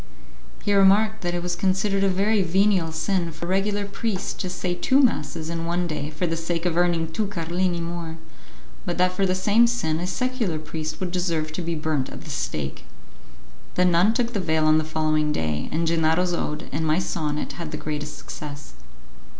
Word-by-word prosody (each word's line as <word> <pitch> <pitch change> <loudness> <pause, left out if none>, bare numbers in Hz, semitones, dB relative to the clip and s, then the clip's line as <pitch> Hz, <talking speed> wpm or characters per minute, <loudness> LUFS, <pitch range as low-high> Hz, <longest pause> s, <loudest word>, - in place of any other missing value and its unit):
He 205 - +1
remarked 205 +3 +5
that 175 0 -1
it 175 - -2
was 175 0 -1
considered 195 +2 +1
a 195 - +4
very 200 +3 +2
venial 185 -1 +2
sin 170 +1 0
for 160 +2 -7
a - - -4
regular 200 +2 +1
priest 200 -1 -3
to 185 - -2
say 180 0 -2
two 260 +10 +3
masses 160 - +1
in 165 0 -3
one 175 +1 0
day 150 -3 -3
for 155 +3 -2
the 165 -1 -1
sake 165 +1 -2
of 175 -2 +1
earning 170 -2 +2
two 210 +5 -1
carlini 175 -1 -1
more, 165 -1 -4 0.7
but 175 - -3
that 180 0 +3
for 190 +1 +1
the 185 - +1
same 210 +5 +4
sin 160 -10 0
a 180 - -2
secular 240 -4 -1
priest 155 0 -5
would 185 -2 -2
deserve 170 -4 -1
to 180 - -3
be 170 0 -2
burnt 150 -4 -1
at - - -9
the - - -7
stake. 70 -3 -3 0.9
The 180 - +4
nun 180 +5 +4
took 240 -1 0
the 205 - 0
veil 160 -3 +1
on 155 0 +5
the - - 0
following 155 -1 +1
day, 80 - -1
and 165 +2 0
Gennaro's 165 +2 +2
ode 150 -2 -2
and 150 +4 -1
my 155 0 +2
sonnet 150 -5 -2
had 165 -2 -4
the 155 - -4
greatest 150 0 -4
success. 145 - -8
175 Hz, 200 wpm, -24 LUFS, 155-190 Hz, 0.9 s, remarked